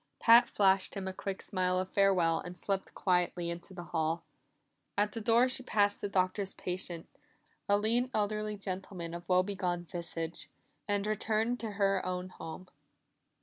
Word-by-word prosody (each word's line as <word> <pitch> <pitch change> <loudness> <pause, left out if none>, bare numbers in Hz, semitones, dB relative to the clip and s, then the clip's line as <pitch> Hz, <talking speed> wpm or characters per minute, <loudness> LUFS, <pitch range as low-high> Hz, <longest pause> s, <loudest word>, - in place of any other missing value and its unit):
Pat 230 +1 +7
flashed 195 -1 +3
him 195 -1 -4
a 190 - -3
quick 195 +1 -4
smile 185 -1 0
of 185 0 0
farewell 180 -5 +3
and 180 0 -7
slipped 195 0 -2
quietly 180 -2 +1
into 170 +3 -7
the 180 -2 -7
hall. 160 +1 0 0.7
At 205 +1 +2
the 230 - -4
door 235 +3 +4
she 255 +1 -1
passed 205 -4 +2
the 205 - -2
Doctor's 190 +1 0
patient 180 -2 -4 0.6
a 205 - +5
lean, 230 +4 +1
elderly 210 -1 -1
gentleman 185 -3 -5
of 175 +1 -8
woe 180 0 +5
begone 185 -3 -2
visage 170 -1 -5 0.4
and 205 -1 +1
returned 220 +3 0
to 220 -2 -4
her 195 -1 +2
own 180 0 -3
home. 175 +1 -8
190 Hz, 160 wpm, -32 LUFS, 180-210 Hz, 0.7 s, Pat